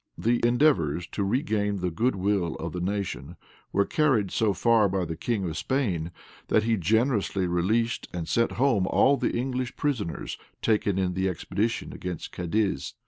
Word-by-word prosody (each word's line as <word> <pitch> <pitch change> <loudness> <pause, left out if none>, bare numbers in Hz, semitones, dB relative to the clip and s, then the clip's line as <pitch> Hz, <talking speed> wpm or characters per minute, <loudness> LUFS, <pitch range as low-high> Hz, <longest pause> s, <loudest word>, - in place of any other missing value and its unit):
The 120 +1 +1
endeavors 120 - +3
to 100 - -1
regain 105 -2 0
the 90 -1 -2
good 115 +9 +1
will 95 -3 0
of 85 0 -5
the 90 - -3
nation 90 -5 -3 0.4
were 100 - +2
carried 130 -11 +2
so 110 -2 +2
far 110 0 +3
by 95 -1 -1
the 80 -1 -4
king 100 +2 -2
of 80 - -4
Spain, 95 - -1 0.4
that 110 - +3
he 115 0 +2
generously 105 - +1
released 105 +7 0
and 85 -2 -4
sent 115 0 +1
home 115 -8 +2
all 140 +7 +4
the 135 - -1
English 130 0 -2
prisoners 120 - -2 0.2
taken 105 -3 +2
in 95 -1 0
the 95 +1 0
expedition 105 +5 -2
against 90 -3 -6
Cadiz. 90 -3 -1
100 Hz, 165 wpm, -27 LUFS, 90-115 Hz, 0.4 s, all